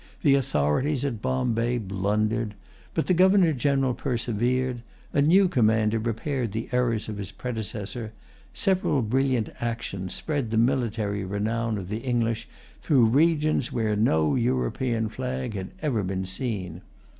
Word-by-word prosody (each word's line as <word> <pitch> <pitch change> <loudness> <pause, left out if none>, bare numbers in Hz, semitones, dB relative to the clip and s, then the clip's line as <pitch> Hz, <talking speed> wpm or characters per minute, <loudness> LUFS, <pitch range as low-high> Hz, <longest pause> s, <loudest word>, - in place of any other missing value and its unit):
The 145 -4 +5
authorities 135 - +1
at 120 -7 -3
Bombay 125 -2 0
blundered. 105 +2 -1 0.4
But 160 - +1
the 185 - +2
Governor 185 -2 +5
General 135 0 +1
persevered. 120 0 -1 0.3
A 140 - +3
new 185 +7 +5
commander 110 -7 +2
repaired 115 +1 -2
the 110 +1 -4
errors 120 -3 +1
of 105 -2 -5
his 100 -1 -5
predecessor. 110 0 -4 0.4
Several 185 - +1
brilliant 130 0 +1
actions 105 -6 -4
spread 145 -7 -2
the 110 - -1
military 115 -5 +1
renown 110 +3 -1
of 95 -3 -6
the 105 +3 -3
English 115 -3 -1 0.3
through 130 -6 +4
regions 155 -2 +2
where 110 -3 0
no 80 -8 +2
European 125 -2 0
flag 125 +1 -4
had 95 -2 -5
ever 130 -8 +1
been 95 0 -2
seen. 95 -1 -3
115 Hz, 135 wpm, -26 LUFS, 105-130 Hz, 0.4 s, The